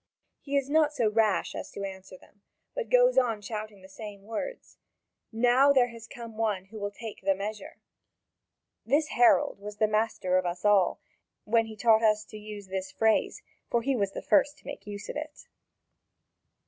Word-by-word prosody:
He 280 0 -2
is 275 -1 0
not 300 0 +2
so 230 -6 +2
rash 215 -5 +1
as - - -6
to 200 - -6
answer 190 -1 -8
them, 205 +2 -23 0.3
but - - -4
goes - - +5
on 230 -4 0
shouting 210 -2 -7
the - - -12
same 200 0 -10
words: 230 - -6 0.5
"Now 245 +4 +4
there 255 -3 +4
has 230 -1 -11
come 230 -2 -10
one 210 -4 -1
who 215 +3 -10
will 205 0 -2
take 220 +1 -9
the 195 0 +2
measure!" 205 +1 -6 1.1
This 295 +6 +1
herald 245 0 +4
was 205 +1 -8
the 215 - +3
master 215 -4 +1
of 185 - -4
us 175 +3 -5
all, 205 -3 +4 0.4
when 225 +1 +2
he 220 - -9
taught 220 0 +4
us 215 -1 +2
to 215 - -8
use 210 -1 -8
the 190 0 -3
phrase, 220 +4 0 0.3
for 235 -1 +1
he 270 +1 +1
was 200 -4 -1
the - - -6
first 280 +7 +3
to - - -24
make - - -8
use 205 -1 -7
of - - -6
it. 305 0 -7
215 Hz, 185 wpm, -28 LUFS, 205-245 Hz, 1.1 s, goes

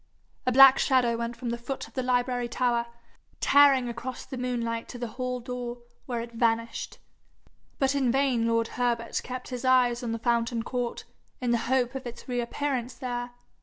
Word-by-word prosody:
A - - +4
black 270 +1 +8
shadow 250 -3 +3
went 235 +1 -3
from 240 -1 -4
the 235 - -3
foot 265 +3 -5
of - - -20
the 260 - -1
library 245 -1 0
tower, 235 -1 0 0.5
tearing 275 -3 +5
across 240 +2 -6
the - - -7
moonlight 235 -2 -2
to - - -8
the 240 -1 -4
hall 250 +1 -3
door, 245 -1 -6 0.2
where 240 -3 -2
it 235 0 -7
vanished. 230 0 -1 0.8
But 270 0 +2
in 265 -4 +2
vain 260 -3 +2
lord 230 0 +1
Herbert 240 -2 -1
kept 255 0 -6
his 250 -1 -5
eyes 250 -2 +3
on 240 -2 -3
the 230 - -1
fountain 235 0 0
court, 245 -1 -3 0.4
in 245 -2 0
the 235 - +2
hope 260 -1 +2
of 265 -2 -5
its 240 - -9
reappearance 250 0 -2
there. 245 -1 -4
245 Hz, 180 wpm, -27 LUFS, 235-255 Hz, 0.8 s, black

